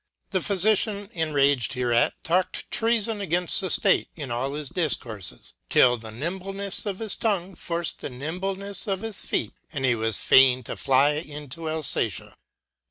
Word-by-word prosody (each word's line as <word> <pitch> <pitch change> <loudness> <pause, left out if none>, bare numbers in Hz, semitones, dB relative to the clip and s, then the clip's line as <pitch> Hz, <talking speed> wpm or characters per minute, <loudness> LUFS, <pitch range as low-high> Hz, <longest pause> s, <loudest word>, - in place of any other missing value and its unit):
The 190 - +1
Phylician 205 +2 +1
enraged 145 - +1
her 125 -1 -1
eat 120 - +3
talked 180 +3 -1
treafon 225 -2 +1
againfl: 175 -1 +2
the 190 - -2
State - - +4
in 145 -6 -6
all 130 +4 -2
his 150 -2 -5
difcourfes, 110 - -2 0.2
till 125 -1 +5
the 110 -1 -9
nimblenefleofhis 195 - -3
tongue 195 -4 -1
forc'd 170 -1 -2
the - - -5
nimbleneffe 185 +9 -2
of 195 -1 -2
his. 225 -3 -2
feet, - - -2 0.2
and 135 -4 -2
he 130 - +4
was 110 -2 +1
fain 130 -1 +5
to - - -6
fly 135 +2 +3
into 150 +1 -6
Alfatia. 150 - -1
160 Hz, 150 wpm, -25 LUFS, 130-195 Hz, 0.2 s, till